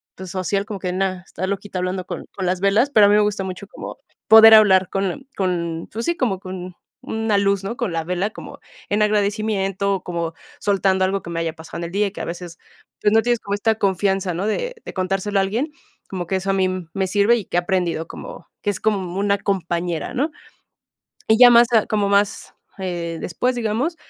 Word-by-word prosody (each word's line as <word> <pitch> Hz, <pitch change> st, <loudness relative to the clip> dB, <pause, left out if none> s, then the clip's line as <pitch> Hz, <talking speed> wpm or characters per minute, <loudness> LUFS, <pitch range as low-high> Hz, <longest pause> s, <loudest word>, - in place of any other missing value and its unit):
pues, 185 Hz, -1 st, -8 dB
social, 195 Hz, +2 st, -1 dB
como 210 Hz, -3 st, -6 dB
que, 180 Hz, -1 st, -3 dB
nada, 185 Hz, -1 st, -1 dB
"Está 190 Hz, +1 st, -5 dB
loquita 200 Hz, -1 st, -4 dB
hablando 185 Hz, 0 st, -2 dB
con -, -, -6 dB
con 190 Hz, -, -3 dB
las 180 Hz, 0 st, 0 dB
velas," 210 Hz, +8 st, +3 dB
pero 210 Hz, -4 st, +6 dB
a -, -, +4 dB
mí 205 Hz, -, +5 dB
me 210 Hz, -, +5 dB
gusta 205 Hz, -2 st, 0 dB
mucho 190 Hz, +1 st, -6 dB
como -, -, -9 dB, 0.3 s
poder 220 Hz, 0 st, +9 dB
hablar 190 Hz, -3 st, +5 dB
con 195 Hz, +8 st, -3 dB
con 170 Hz, -3 st, -2 dB
pues, 230 Hz, +2 st, -4 dB
sí, 340 Hz, -, +1 dB
como 205 Hz, -8 st, 0 dB
con 185 Hz, -1 st, -7 dB, 0.3 s
una 220 Hz, -2 st, -1 dB
luz, 200 Hz, -1 st, +1 dB
¿no?, 230 Hz, +5 st, -4 dB
con 215 Hz, -8 st, -2 dB
la 165 Hz, -1 st, -1 dB
vela 180 Hz, +5 st, -2 dB
como -, -, -10 dB, 0.3 s
en 210 Hz, +1 st, +2 dB
agradecimiento, 200 Hz, -2 st, 0 dB
como 170 Hz, -2 st, -3 dB, 0.3 s
soltando 190 Hz, -2 st, +2 dB
algo 195 Hz, +1 st, -1 dB
que 170 Hz, -, -9 dB
me 165 Hz, 0 st, -3 dB
haya 165 Hz, -1 st, -2 dB
pasado 165 Hz, 0 st, -10 dB
en -, -, -4 dB
el 170 Hz, -, -7 dB
día 205 Hz, +1 st, +1 dB
y -, -, -6 dB
que -, -, -7 dB
a -, -, -3 dB
veces, 170 Hz, -1 st, -7 dB, 0.4 s
pues, 210 Hz, -, +3 dB
no 225 Hz, -, +5 dB
tienes 240 Hz, -1 st, +1 dB
como 200 Hz, -, -5 dB
esta 220 Hz, +2 st, +1 dB
confianza, 195 Hz, -2 st, 0 dB
¿no?, 190 Hz, +5 st, -2 dB
de -, -, -2 dB
de -, -, -8 dB
contárselo 195 Hz, +2 st, -1 dB
a -, -, +4 dB
alguien, 235 Hz, +11 st, -2 dB, 0.4 s
como 180 Hz, -2 st, -4 dB
que 190 Hz, -, 0 dB
eso 195 Hz, +1 st, -4 dB
a -, -, +3 dB
mí 190 Hz, -1 st, +2 dB, 0.3 s
me 190 Hz, -1 st, +1 dB
sirve 205 Hz, +5 st, +3 dB
y 205 Hz, -, -5 dB
que 175 Hz, -, -2 dB
he -, -, +6 dB
aprendido 175 Hz, -3 st, -1 dB
como -, -, -10 dB, 0.2 s
que 205 Hz, -, +1 dB
es 190 Hz, -, -5 dB
como 195 Hz, -4 st, -1 dB
una 200 Hz, 0 st, +2 dB
compañera, 175 Hz, -4 st, -2 dB
¿no?, 295 Hz, +5 st, 0 dB, 1.0 s
y 220 Hz, +1 st, +5 dB
ya 245 Hz, -1 st, +9 dB
más 235 Hz, 0 st, +7 dB
a 220 Hz, -, +5 dB
como 205 Hz, -2 st, 0 dB
más 200 Hz, 0 st, +1 dB, 0.2 s
eh, 170 Hz, -3 st, -4 dB
después, 250 Hz, +8 st, -1 dB
digamos, 240 Hz, +8 st, -1 dB
195 Hz, 220 wpm, -21 LUFS, 185-210 Hz, 1.0 s, poder